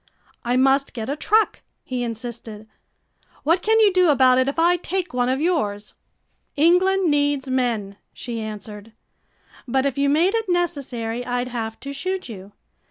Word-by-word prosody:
"I 245 Hz, 0 st, 0 dB
must 270 Hz, +2 st, +2 dB
get 225 Hz, 0 st, -4 dB
a 285 Hz, -, -1 dB
truck," 430 Hz, +7 st, +1 dB, 0.2 s
he 250 Hz, -1 st, -3 dB
insisted. 230 Hz, -2 st, -6 dB, 0.8 s
"What 335 Hz, +5 st, +2 dB
can 445 Hz, +3 st, +3 dB
you 420 Hz, -3 st, +5 dB
do 365 Hz, -2 st, +4 dB
about 260 Hz, -3 st, +5 dB
it 260 Hz, -, +2 dB
if 280 Hz, -, -2 dB
I 345 Hz, +2 st, +4 dB
take 365 Hz, -1 st, -3 dB
one 250 Hz, 0 st, +1 dB
of 260 Hz, +1 st, 0 dB
yours?" 210 Hz, -, -1 dB, 0.6 s
"England 360 Hz, +3 st, +3 dB
needs 285 Hz, -2 st, 0 dB
men," 230 Hz, -6 st, -1 dB
she 235 Hz, -2 st, -6 dB
answered. 215 Hz, 0 st, -8 dB, 0.7 s
"But 265 Hz, +2 st, +1 dB
if 280 Hz, -1 st, -1 dB
you 280 Hz, 0 st, +2 dB
made 335 Hz, +7 st, +3 dB
it 450 Hz, -3 st, -1 dB
necessary 270 Hz, -10 st, -2 dB
I'd 245 Hz, 0 st, -2 dB
have 225 Hz, -2 st, -5 dB
to 280 Hz, 0 st, -6 dB
shoot 370 Hz, +6 st, -3 dB
you. 200 Hz, -2 st, -10 dB
270 Hz, 165 wpm, -22 LUFS, 235-340 Hz, 0.8 s, you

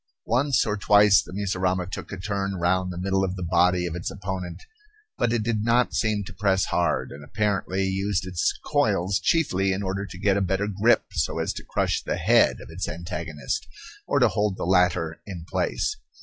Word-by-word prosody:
Once 130 Hz, +4 st, +2 dB
or 105 Hz, -2 st, -1 dB
twice 105 Hz, 0 st, +5 dB
the -, -, -12 dB
mussurama 95 Hz, -2 st, -1 dB
took 95 Hz, -, -7 dB
a 100 Hz, -, -5 dB
turn 100 Hz, 0 st, -2 dB
round 90 Hz, +1 st, 0 dB
the 85 Hz, -, -7 dB
middle 95 Hz, +1 st, 0 dB
of 95 Hz, -1 st, -2 dB
the 90 Hz, -, -5 dB
body 90 Hz, +1 st, +3 dB
of 85 Hz, -1 st, -4 dB
its 90 Hz, -, -3 dB
opponent, 95 Hz, -2 st, -6 dB, 0.5 s
but 120 Hz, -, 0 dB
it 115 Hz, -2 st, 0 dB
did 110 Hz, -2 st, 0 dB
not 120 Hz, +2 st, +2 dB
seem 110 Hz, -2 st, 0 dB
to 90 Hz, -, -10 dB
press 95 Hz, 0 st, +1 dB
hard, 85 Hz, -2 st, 0 dB
and 70 Hz, +1 st, -10 dB
apparently 95 Hz, +1 st, -1 dB
used 95 Hz, 0 st, -1 dB
its 90 Hz, -3 st, 0 dB
coils 95 Hz, +4 st, +1 dB
chiefly 95 Hz, -, +1 dB
in 95 Hz, +2 st, -2 dB
order 95 Hz, +1 st, -2 dB
to 95 Hz, -, -10 dB
get 100 Hz, +1 st, +2 dB
a -, -, +1 dB
better 95 Hz, +1 st, 0 dB
grip 105 Hz, +4 st, +3 dB
so -, -, -1 dB
as -, -, -1 dB
to -, -, -8 dB
crush -, -, -1 dB
the -, -, -2 dB
head -, -, +4 dB
of -, -, -11 dB
its 90 Hz, +3 st, -4 dB
antagonist, 80 Hz, -4 st, -4 dB, 0.4 s
or -, -, +1 dB
to -, -, +5 dB
hold 105 Hz, -2 st, 0 dB
the -, -, -3 dB
latter 90 Hz, -3 st, +2 dB
in 90 Hz, -5 st, -7 dB
place. -, -, -1 dB
95 Hz, 200 wpm, -25 LUFS, 90-100 Hz, 0.5 s, twice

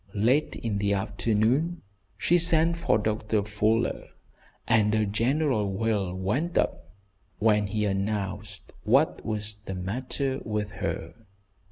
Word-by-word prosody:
Late 125 Hz, +9 st, +2 dB
in 105 Hz, -3 st, -3 dB
the 100 Hz, 0 st, +1 dB
afternoon 115 Hz, -, 0 dB, 0.3 s
she 175 Hz, +1 st, +3 dB
sent 165 Hz, 0 st, +4 dB
for 170 Hz, -11 st, +2 dB
Doctor 105 Hz, 0 st, -1 dB
Fuller, 105 Hz, +2 st, 0 dB, 0.6 s
and 110 Hz, -1 st, +3 dB
a 110 Hz, -1 st, +2 dB
general 115 Hz, 0 st, +1 dB
wail 100 Hz, -3 st, -1 dB
went 125 Hz, -, -1 dB
up -, -, -1 dB, 0.4 s
when 105 Hz, -1 st, +3 dB
he 105 Hz, +1 st, -1 dB
announced 100 Hz, 0 st, -3 dB
what -, -, +2 dB
was 105 Hz, -1 st, -4 dB
the 95 Hz, -, -4 dB
matter 130 Hz, +8 st, -2 dB
with 105 Hz, -1 st, -3 dB
her. -, -, -4 dB
105 Hz, 125 wpm, -27 LUFS, 100-125 Hz, 0.6 s, sent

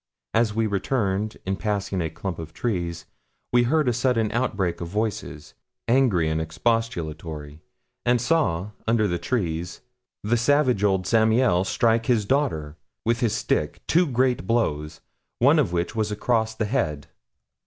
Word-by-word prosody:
As 110 Hz, -2 st, +2 dB
we 115 Hz, 0 st, +1 dB
returned, 105 Hz, 0 st, -1 dB
in 95 Hz, +1 st, 0 dB
passing 100 Hz, -3 st, -2 dB
a 80 Hz, -, -1 dB
clump 85 Hz, +3 st, -5 dB
of 80 Hz, 0 st, -8 dB
trees, 85 Hz, -7 st, -3 dB, 0.5 s
we 120 Hz, -, +6 dB
heard 145 Hz, +4 st, +2 dB
a 125 Hz, -, +3 dB
sudden 120 Hz, -3 st, +1 dB
outbreak 100 Hz, -8 st, -1 dB
of 85 Hz, -, -3 dB
voices, 100 Hz, -6 st, -4 dB, 0.3 s
angry 115 Hz, -10 st, +3 dB
and 80 Hz, 0 st, 0 dB
expostulatory; 80 Hz, -6 st, -3 dB, 0.4 s
and 120 Hz, 0 st, +3 dB
saw, 115 Hz, -, +1 dB, 0.2 s
under 110 Hz, -2 st, +3 dB
the 85 Hz, -2 st, -1 dB
trees, 90 Hz, -, -2 dB, 0.4 s
the 115 Hz, +3 st, +2 dB
savage 125 Hz, -3 st, +2 dB
old 95 Hz, -2 st, +2 dB
Zamiel 110 Hz, -3 st, +3 dB
strike 115 Hz, -1 st, +2 dB
his 115 Hz, -5 st, +2 dB
daughter 100 Hz, -, -1 dB, 0.3 s
with 115 Hz, +1 st, +1 dB
his 120 Hz, -4 st, +1 dB
stick -, -, -1 dB
two 175 Hz, +1 st, +3 dB
great 125 Hz, -6 st, +1 dB
blows, 80 Hz, -10 st, -1 dB, 0.4 s
one -, -, +5 dB
of -, -, +1 dB
which 85 Hz, +4 st, -2 dB
was 110 Hz, -1 st, 0 dB
across 110 Hz, +1 st, 0 dB
the 110 Hz, -, -1 dB
head. 75 Hz, -, -1 dB
105 Hz, 150 wpm, -24 LUFS, 85-120 Hz, 0.5 s, we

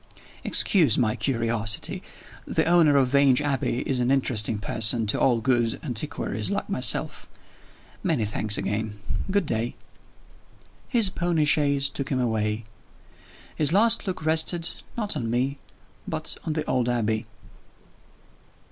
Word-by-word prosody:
"Excuse 160 Hz, -, +4 dB
my 110 Hz, -4 st, +1 dB
curiosity. 115 Hz, -5 st, 0 dB, 0.5 s
The -, -, 0 dB
owner 165 Hz, -4 st, +4 dB
of 135 Hz, -2 st, +3 dB
Vange 140 Hz, -1 st, +4 dB
Abbey 135 Hz, -3 st, -1 dB
is 130 Hz, -2 st, 0 dB
an 125 Hz, 0 st, 0 dB
interesting 120 Hz, -5 st, +1 dB
person 110 Hz, +2 st, +1 dB
to 105 Hz, -, 0 dB
all 120 Hz, -3 st, +3 dB
good 120 Hz, -2 st, +1 dB
antiquaries 115 Hz, -, -2 dB
like -, -, -2 dB
myself. -, -, -1 dB, 0.7 s
Many 110 Hz, -, 0 dB
thanks 105 Hz, 0 st, 0 dB
again. 105 Hz, 0 st, -3 dB, 0.3 s
Good 200 Hz, -2 st, +1 dB
day." 115 Hz, -2 st, -1 dB, 1.1 s
His 230 Hz, -7 st, +1 dB
pony 170 Hz, -4 st, 0 dB
chaise 140 Hz, -2 st, +2 dB
took 140 Hz, 0 st, -5 dB
him 130 Hz, -, -1 dB
away. 110 Hz, -2 st, -1 dB, 0.9 s
His 150 Hz, +1 st, +3 dB
last 225 Hz, +2 st, +4 dB
look 180 Hz, -4 st, -4 dB
rested 165 Hz, +2 st, +1 dB, 0.3 s
not 210 Hz, -5 st, -2 dB
on 120 Hz, -6 st, -3 dB
me 130 Hz, +4 st, -1 dB, 0.5 s
but -, -, -3 dB
on 160 Hz, -, -1 dB
the 155 Hz, 0 st, -3 dB
old 125 Hz, -2 st, 0 dB
Abbey. 110 Hz, -2 st, -1 dB
130 Hz, 130 wpm, -25 LUFS, 110-155 Hz, 1.1 s, Excuse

